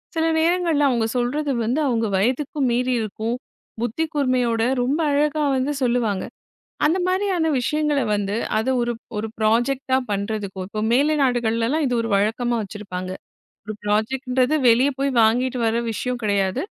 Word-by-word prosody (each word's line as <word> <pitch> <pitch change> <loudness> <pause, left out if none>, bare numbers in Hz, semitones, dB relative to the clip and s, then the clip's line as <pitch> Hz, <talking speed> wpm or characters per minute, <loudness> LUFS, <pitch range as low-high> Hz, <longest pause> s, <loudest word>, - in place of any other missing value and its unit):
சில 325 0 +1
நேரங்களில் 330 -3 +2
அவர்கள் 230 -3 0
சொல்கிறது 280 +4 -1
வந்து 245 +7 0
அவர்கள் 225 -5 0
வயதுக்கும் 260 +6 0
மீறி 250 +1 +1
இருக்கும், 220 +2 -3 0.5
புத்தி 240 +7 -1
கூர்மையோடே, 250 -5 +1
மிகவும் 265 +5 0
அழகாக 295 +1 +1
வந்து 265 +3 0
சொல்வார்கள். 235 -6 0 0.5
அந்த 330 +5 +3
மாதிரியான 370 -3 +1
விஷயங்களை 300 +1 0
வந்து, 205 0 -2 0.2
அது 220 +4 0
ஒரு 240 0 -1 0.2
ஒரு 215 +1 -2
ப்ராஜெக்ட் 240 +5 +1
டாக 260 0 +4
பண்ணுவதற்கு, 200 -1 -3
இப்போ 215 +1 -4
மேலைநாடுகளில் 245 -5 +2
எல்லாம் 300 +3 +1
இது 250 - -1
ஒரு 230 - -3
வழக்கமாக 230 +4 0
வைத்திருப்பார்கள். 190 -3 -6 0.5
ஒரு 215 - -4
ப்ராஜெக்ட் 220 +6 0
என்கிறது 255 +4 +2
வெளிய 245 +5 +4
போய் 275 0 +1
வாங்கிவிட்டு 250 +3 +2
வருகிற 230 +1 +1
விஷயம் 250 +2 -3
கிடையாது. 200 +4 0
245 Hz, 145 wpm, -22 LUFS, 220-280 Hz, 0.5 s, டாக